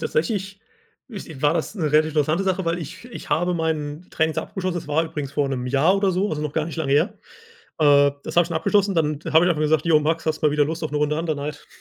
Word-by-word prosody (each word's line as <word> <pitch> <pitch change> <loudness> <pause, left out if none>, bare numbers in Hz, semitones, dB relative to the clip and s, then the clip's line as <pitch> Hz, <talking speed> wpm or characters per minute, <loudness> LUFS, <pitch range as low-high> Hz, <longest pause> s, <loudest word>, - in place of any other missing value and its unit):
Tatsächlich 195 +4 -2 0.5
is 205 -7 -8
war 145 +1 +4
das 165 +5 -2
'ne 155 -7 -2
relativ 155 +1 +4
interessante 155 +5 +1
Sache, 190 -1 0
weil 165 +1 0
ich 165 - -8
ich 245 - -10
habe 175 +2 +1
meine 155 -1 -2
Trainings 160 0 0
abgeschlossen. 185 -2 -3
Das 160 - -6
war 160 +3 +1
übrigens 150 -4 -6
vor 140 -1 0
'nem 125 -2 -3
Jahr 145 +9 +3
oder 195 -1 +2
so, 190 +3 0
also, 150 -1 -3
noch 150 -1 -3
gar 155 - 0
nicht 165 - -7
lange 145 -4 -1
her, 190 +9 +1 0.6
äh, 145 -2 +5
das - - -6
habe 175 - +7
ich 170 - -9
schon 165 - -2
abgeschlossen. 200 +3 +2
Dann 150 -3 0
habe 160 +1 +4
ich 180 - +3
einfach 155 -3 0
gesagt: 155 +1 +1
„Jo 155 -2 +5
Max, 160 +2 -1
hast 155 0 -1
du - - +4
mal - - +3
wieder 150 -1 +3
Lust 160 +3 -4
auf 155 - -2
'ne 150 - -1
Runde 150 +1 0
Under 165 -2 -1
Night? 145 +1 -6
160 Hz, 265 wpm, -22 LUFS, 150-175 Hz, 0.6 s, habe